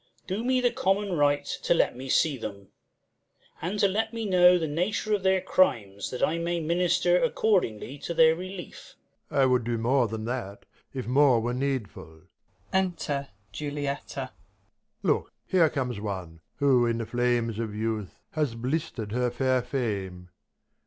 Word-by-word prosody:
Do 195 +4 -3
me 255 +1 +2
the 245 -1 +3
common 195 0 0
right 145 -2 +2
To 170 - 0
let - - +2
me 130 +2 -7
see 150 +2 +3
them; 100 -5 -8 0.9
and 180 +6 -2
to 200 - +6
let 220 +4 -1
me 225 -1 -3
know 180 -2 +6
The 165 - -1
nature 180 +7 -1
of 205 - +1
their 190 0 +3
crimes, 100 - +1
that 125 - -4
I 165 +2 -2
may 170 0 -1
minister 175 +2 +2
Accordingly 160 - 0
to 170 - -5
their 160 0 +6
relief. 185 +1 -9 0.3
Prov. 140 - +1
I - - +6
would 125 -2 +3
do 120 0 -1
more 120 +2 +2
than 110 0 -5
that, 115 -5 -5 0.3
if 130 -2 -5
more 130 -1 +4
were 120 +2 -2
needful. 115 - -4 0.5
Look, 190 -3 0 2.4
here 170 -4 +4
comes 125 -6 -3
one! 95 -6 -5 0.2
who 130 -4 +3
in 115 0 0
her 115 - -2
flames 120 -1 0
of 110 -2 -3
youth 110 +1 0
Enter 105 -3 -8
Juliet. - - -36
Has 150 -7 -1
blister'd 120 -3 -3
her 125 +2 +1
fair 130 +1 +1
fame. 100 -8 -3
135 Hz, 160 wpm, -27 LUFS, 115-175 Hz, 2.4 s, to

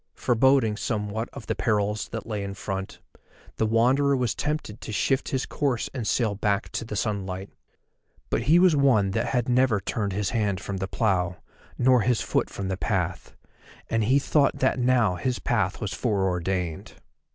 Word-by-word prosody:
Foreboding 120 -2 +3
somewhat 110 +1 -2
of - - -9
the - - -1
perils 105 -1 0
that 115 - -6
lay 105 -3 -3
in 100 0 -5
front, 95 -1 -5 0.6
the 110 - +1
Wanderer 130 +5 +3
was 125 -4 0
tempted 150 -8 -3
to - - -6
shift 130 +6 0
his 130 -1 -1
course 135 -6 -1
and 120 -5 -4
sail 110 +1 +1
back 100 +1 -1
to - - -3
the 110 -2 -6
sunlight. 95 -2 -3 0.8
But - - +1
he 165 - +7
was 180 -3 +5
one 125 -9 +3
that - - -1
had 125 -1 0
never 125 -3 +3
turned 100 +1 -2
his 100 -1 -1
hand 105 -5 0
from 100 0 -5
the 95 0 -3
plough, 90 -5 0 0.4
nor 125 -1 +4
his 120 +1 +2
foot - - 0
from 100 - -5
the 95 -1 -2
path, - - -2 0.6
and 115 -1 +2
he 130 +5 +4
thought 140 0 +2
that 130 0 +1
now 120 -7 +2
his 125 +6 -1
path 105 -6 -1
was 100 -3 -3
fore 100 -2 0
ordained. 90 -2 -2
110 Hz, 180 wpm, -26 LUFS, 100-125 Hz, 0.8 s, he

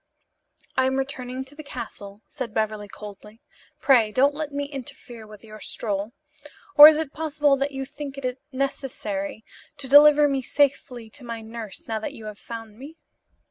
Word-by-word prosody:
"I 260 0 +3
am 265 - 0
returning 265 -1 -4
to 270 - -14
the 305 - -9
castle," 205 -7 -9
said 255 -6 -6
Beverly 215 -1 -1
coldly, 210 +2 -11 0.4
"Pray 240 -7 +4
don't 275 +6 +3
let 300 0 -4
me 285 0 -2
interfere 245 -5 -9
with 210 0 -14
your 215 -1 -12
stroll. 210 +1 -4 0.6
Or 295 0 +13
is 310 -1 +6
it 310 -3 -3
possible 295 -2 +1
that 275 +1 0
you 270 -1 -5
think 280 0 -8
it 255 -1 -4
necessary 230 -7 -4 0.3
to 280 -2 -6
deliver 295 +1 +8
me 275 -2 0
safely 260 -3 0
to 285 - -11
my 230 -1 -6
nurse, 220 -2 -8
now 220 -1 -2
that 215 - -5
you 220 - -11
have 210 -1 -8
found 225 -2 -9
me?" 300 +5 -11
260 Hz, 175 wpm, -24 LUFS, 220-285 Hz, 0.6 s, Or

